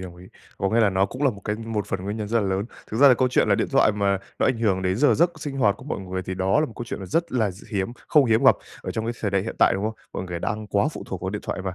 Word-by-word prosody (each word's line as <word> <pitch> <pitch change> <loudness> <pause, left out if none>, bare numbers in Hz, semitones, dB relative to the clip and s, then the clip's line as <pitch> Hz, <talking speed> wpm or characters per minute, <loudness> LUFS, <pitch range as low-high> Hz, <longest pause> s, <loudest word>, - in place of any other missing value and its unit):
đồng 90 -2 -8
ý. 90 +1 -13 0.3
Có 95 - 0
nghĩa 115 - +3
là 105 -3 +4
nó 95 +1 +2
cũng 130 +7 -7
là 140 - +4
một 100 -4 -10
cái 105 - -1
một 110 -2 -3
phần 95 -1 -3
nguyên 100 +2 -3
nhân 105 -2 -4
rất 115 +1 +2
là 100 - -1
lớn. 95 +1 -1 0.3
Thực 110 - -3
ra 140 +4 +7
là 130 - +7
câu 130 +1 +2
chuyện 125 - +2
là - - +5
điện - - 0
thoại 110 - +4
mà 100 -1 +1 0.2
nó - - +2
ảnh 130 -3 +1
hưởng 100 -5 +1
đến 95 0 0
giờ 145 +6 +4
giấc 170 +2 +3
sinh 145 -3 -5
hoạt 105 -6 +3
của 130 - -13
mọi 145 - -3
người 95 0 -4
thì 95 - -5
đó 95 +8 +2
là 155 - +1
một 120 - -11
câu 120 - -5
chuyện 100 -4 -6
rất 165 - -1
là 110 -5 +1
d 95 +2 -13
hiếm 100 +1 -2 0.2
không 150 -3 +5
hiếm 115 -2 +2
gặp - - +8 0.3
ở - - -4
trong 110 - -3
cái 115 - -1
thời 105 - -1
đại 95 -1 +1
hiện 115 - -6
tại, - - +5
đúng 95 +2 -2
không? 110 +1 -2 0.2
Mọi - - -4
người 90 -2 -5
đang 105 +4 -3
quá 100 +2 +1
phụ - - -8
thuộc 95 - -5
vào 95 - -3
điện 105 +1 -5
thoại - - -4
và 95 -1 -4
105 Hz, 355 wpm, -24 LUFS, 95-115 Hz, 0.3 s, gặp